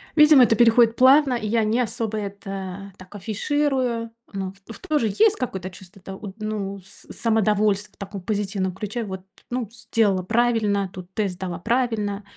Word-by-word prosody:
Видимо 300 -4 +8
это 225 -1 +4
переходит 230 0 +5
плавно 270 +2 +5
и 235 -3 -2
я 225 +1 +2
не 225 +3 +1
особо 220 -1 -3
это 195 -1 -6
так 185 +1 -14
афиширую. 235 +2 -1 0.2
Ну 190 -2 -4 0.2
ф 225 - -9
в - - -25
тоже 295 -7 +1
есть 420 - +3
какое-то 190 -7 -4
чувство 190 +1 -15
это 190 +1 -8
уд 195 -1 -9
ну 205 -2 -4
с 190 +1 -12
самодовольства 210 -2 +1
в - - -28
таком 200 0 -7
позитивном 195 -2 -2
ключе. 210 +5 -4
Вот 190 -3 -6 0.3
ну 250 0 -2
ф 220 - -21
сделала 220 -5 0
правильно, 215 -3 +1
тут 185 0 -10
тест 195 -4 -1
сдала 180 -2 -5
правильно. 215 -2 -1
210 Hz, 175 wpm, -23 LUFS, 195-235 Hz, 0.3 s, Видимо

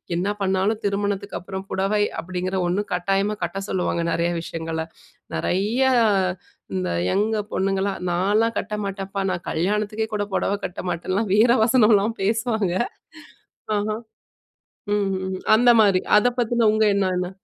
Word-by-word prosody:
என்ன 180 +4 0
பண்ணாலும் 195 +3 +1
திருமணத்துக்கப்பறம் 200 -1 -3
புடவை 195 +2 +1 0.2
அப்படீங்கிற 185 +2 -3
ஒண்ணு 185 +4 0
கட்டாயமா 195 +3 0
கட்ட 175 +3 -3
சொல்லுவாங்க 175 -2 -1
நெறைய 170 +1 0
விஷயங்கள்ல. 165 -1 -4 0.5
நெறைய 200 - 0 0.9
இந்த 90 -1 -1 0.2
யங் 205 - +2 0.3
பொண்ணுங்கள்லாம், 195 0 -1
நான்லாம் 210 +6 +1
கட்ட - - -6
மாட்டேன்ப்பா. 195 0 -4
நா - - 0
கல்யாணத்துக்கே 210 +5 -1
கூட 205 -1 -1
பொடவை 200 - 0
கட்ட 180 - -5
மாட்டேன்லாம் 185 +4 -2
வீர 230 +3 +5
வசனம்லாம் 220 -2 +3
பேசுவாங்க. 220 -2 0 1.0
ஆஹா. 215 +1 -1 1.0
ம்ஹ்ஹ்ம். 190 -2 -1 0.2
அந்த 245 +2 +5
மாரி. 195 -3 +3 0.2
அத 210 - +3
பத்தின 235 -1 +2
உங்க 220 0 +2
எண்ணம் 190 -2 +1
என்ன? 180 0 -2
195 Hz, 125 wpm, -23 LUFS, 185-210 Hz, 1.0 s, வீர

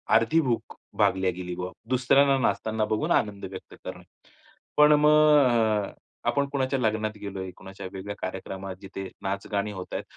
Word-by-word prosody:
अर्धी 115 +9 +4
भूक 115 - -2 0.2
भागल्या 95 -1 +2
गेली 90 0 -6
बुवा. 90 +1 -5 0.2
दुसऱ्यांना 135 +2 +4
नाचताना 110 -3 0
बघून 110 0 -1
आनंद 100 -1 +1
व्यक्त 95 -1 -10
करणे. - - -7 0.7
पण 150 0 +7
मग 135 -9 +4
अ, - - -20 0.4
आपण 140 -1 0
कुणाच्या 135 -1 0
लग्नात 110 -2 -1
गेलोय, 95 -2 -5
कुणाच्या 95 0 -9
वेगळ्या 100 +2 -6
कार्यक्रमात 95 +1 -5
जिथे 95 -1 -7
नाच-गाणी 100 +1 -2
होत 95 -2 -8
आहेत, - - -2
105 Hz, 150 wpm, -26 LUFS, 95-130 Hz, 0.7 s, पण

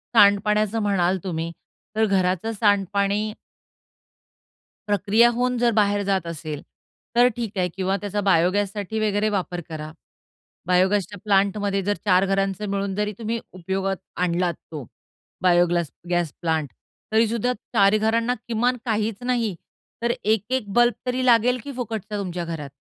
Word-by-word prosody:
सांडपाण्याचं 210 +1 +4
म्हणाल 190 -3 +2
तुम्ही, 165 -3 -3 0.4
तर 220 0 +3
घराचं 190 +1 +1
सांडपाणी 205 0 +1 1.5
प्रक्रिया 205 +4 +4
होऊन 250 +1 0
जर 240 0 +3
बाहेर 205 0 +2
जात 190 -3 0
असेल 155 -3 -5 0.5
तर 245 +1 +6
ठीक 225 -4 -5
आहे 180 -1 +2
किंवा 190 0 0
त्याचा 205 0 -2
बायोगॅससाठी 200 +4 +1
वगैरे 215 0 +1
वापर 180 -3 -2
करा. 155 -1 -6 0.8
बायोगॅसच्या 190 +2 +2
प्लांटमध्ये 200 -1 +1
जर 205 +2 +1
चार 185 -1 +4
घरांचा 195 +1 0
मिळून 195 -1 -2
जरी 210 +1 -1
तुम्ही 230 +1 -2
उपयोगात 190 +2 -2 0.3
आणलात 175 0 0 0.2
तो 150 -5 -6 0.6
बायोग्लास 175 -3 +3 0.2
गॅस 175 -3 0
प्लांट. 160 -3 0 0.5
तरीसुद्धा 230 +2 +2 0.2
चार 200 +2 +5
घरांना 230 +3 +1
किमान 240 +2 +1
काहीच 220 -2 0
नाही, 240 -6 0 0.5
तर 235 0 +1
1-1 220 +2 0
बल्ब 240 +1 +4
तरी 255 0 -1
लागेल, 245 +1 +4
की 285 - -6
फुकटचा 220 -4 -4
तुमच्या 180 -3 -3
घरात. 160 -4 -5
200 Hz, 130 wpm, -23 LUFS, 185-220 Hz, 1.5 s, तर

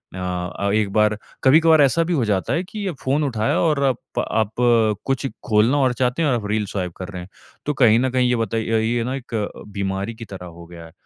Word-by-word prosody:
अ - - -7
अ, 90 +2 -3
एक 105 -2 +1
बार 105 0 +3 0.3
कभी-कभार 160 +3 +6
ऐसा 155 +5 +3
भी 175 - -2
हो 135 -8 +1
जाता 100 -3 0
है 170 - 0
कि 205 +2 -7
अ, - - -1
फ़ोन 140 +3 +1
उठाया 115 -6 0
और 150 -4 +1
अप 130 -3 -2
आप 110 -2 0 0.5
कुछ 135 0 -1 0.2
खोलना 115 +5 +3
और 130 -3 +2
चाहते 125 +5 0
हैं 155 - +2
और 115 -5 -1
रील 105 -1 0
स्वाइप 95 -2 -4
कर 95 - -6
रहे 90 -3 -7
हैं, 90 - -11 0.4
तो 150 - 0
कहीं 120 -5 +5
न 130 +1 +1
कहीं 125 -1 +1
ये 125 - +2
बताइए 115 -1 0
ये 115 +1 0
ना 130 +2 -3
एक 130 -2 -9
अ, 105 -2 -1 0.2
बीमारी 100 +2 -3
की 115 - -9
तरह 95 -3 -9
हो 85 -1 -11
गया 85 -1 -11
है। 80 - -14
115 Hz, 240 wpm, -21 LUFS, 100-135 Hz, 0.5 s, कभी-कभार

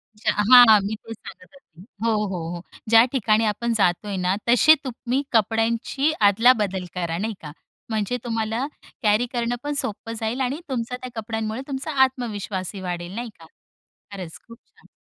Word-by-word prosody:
अच्छा, 215 +2 0 0.2
हां, 240 -4 +9
मी 215 +2 -2
तेच 225 +1 -11
सांगत 180 - -13
होती. 180 - -18 0.2
हो, 230 - +3 0.2
हो, 190 -2 -4 0.2
हो, 175 - -7 0.3
ज्या 225 0 +8
ठिकाणी 220 -3 +2
आपण 230 +3 -1
जातोय 200 0 0
ना, 185 +1 +2
तसे 270 +6 +7
तुम्ही 255 0 -2
कपड्यांची 230 +6 +1 0.2
अदलाबदल 205 -4 +2
करा. 170 -2 -2
नाही 220 +3 -2
का? 150 -2 -8 0.4
म्हणजे 220 +2 -1
तुम्हाला 225 +2 -2 0.4
कॅरी 210 +3 +3
करणंपण 245 +4 -2
सोपं 225 +2 -6
जाईल 230 +3 -2
आणि 265 +4 -1
तुमचा 250 -1 -3
त्या 255 0 -8
कपड्यांमुळे 220 +1 -4
तुमचा 275 +2 -4
आत्मविश्वासही 205 -7 -3
वाढेल. 175 0 -5
नाही 240 0 -4
का. 165 - -14 0.7
खरंच 180 -5 -8
खूप 230 0 -13
छान. - - -25
225 Hz, 155 wpm, -23 LUFS, 200-245 Hz, 0.7 s, हां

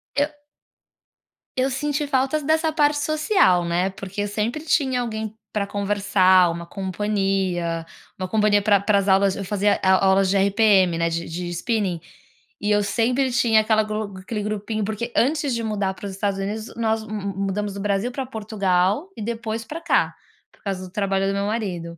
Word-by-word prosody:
Eu 290 +1 +2 1.3
eu 260 +1 +2
senti 290 +2 -1
falta 270 +3 +1
dessa 315 +2 +1
parte 295 -1 +2
social, 305 - +3
né, 175 +3 +1
porque 195 +1 -6
eu 205 - -1
sempre 220 +8 -2
tinha 265 -5 +1
alguém 220 -2 -4 0.2
para 205 -2 -1
conversar. 195 -3 +3
Uma 170 0 -6
companhia 190 -3 -1 0.3
uma 185 - -2
companhia 210 +1 +3
pra 200 -1 +4
pra 200 +1 +2
as 195 - -2
aulas, 195 0 +4
eu 195 - -4
fazia 205 +1 +1
au 190 0 +4
aulas 190 0 +3
de 200 - +2
RPM, 195 -3 +4
né, 170 0 +1
de 165 0 -3
de 175 +2 -5
spinning. 185 0 -1 0.6
E 210 - 0
eu 205 0 +3
sempre 245 +6 +1
tinha 235 -3 +4
aquela 215 0 +2
glo 215 -1 -4
aquele 210 +2 -4
grupinho, 215 +1 -3
porque 220 +3 -4
antes 285 +1 +2
de 230 - -3
mudar 205 -3 -1
para 205 - -9
os - - -5
Estados 195 0 -2
Unidos, 215 +3 -4
nós 225 -1 0
mu 215 - -8
mu 200 -2 -4
mudamos 205 +1 -2
do - - -5
Brasil 205 +4 0
para 265 +1 -4
Portugal, 205 - 0
e - - -6
depois 225 0 -3
para 315 +8 -7
cá, - - +2 0.4
por - - -28
causa 190 -2 -3
do 180 - -12
trabalho 195 -1 0
do 195 - 0
meu 200 0 -1
marido. 180 -7 -3
205 Hz, 185 wpm, -23 LUFS, 195-230 Hz, 1.3 s, pra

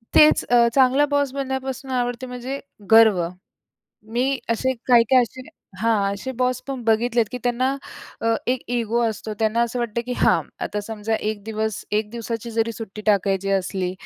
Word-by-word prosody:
तेच 305 0 +7
अ, 240 -1 +5
चांगला 270 +2 +5
बॉस 285 -2 +1
बनण्यापासून 265 -1 -4
आवडते 245 0 -1
म्हणजे 250 +2 -5 0.3
गर्व. 215 -7 +6 0.9
मी 260 +3 +1
असे 260 +3 +1
काही-काही 245 +1 +5
असे 250 +2 -6 0.4
हां 210 -3 +1
असे 260 +6 -5
बॉस 250 0 +1
पण 270 -3 -4
बघितलेत 230 +1 +2
की 250 - -3
त्यांना 255 +2 0 0.4
अ, 230 0 +2
एक 250 0 +1 0.2
इगो 235 0 0
असतो. 215 0 -5
त्यांना 220 +1 +1
असं 235 +1 -2
वाटतं 235 -1 -1
की 250 - -2
हां. - - +4 0.2
आता 210 - -3
समजा 220 0 -2
1 215 -1 -3
दिवस, 220 -1 -3
1 210 0 0
दिवसाची 230 0 -5
जरी 230 0 0
सुट्टी 215 -1 -8
टाकायची 195 -1 +2
असली 180 -1 -3
235 Hz, 160 wpm, -22 LUFS, 215-255 Hz, 0.9 s, तेच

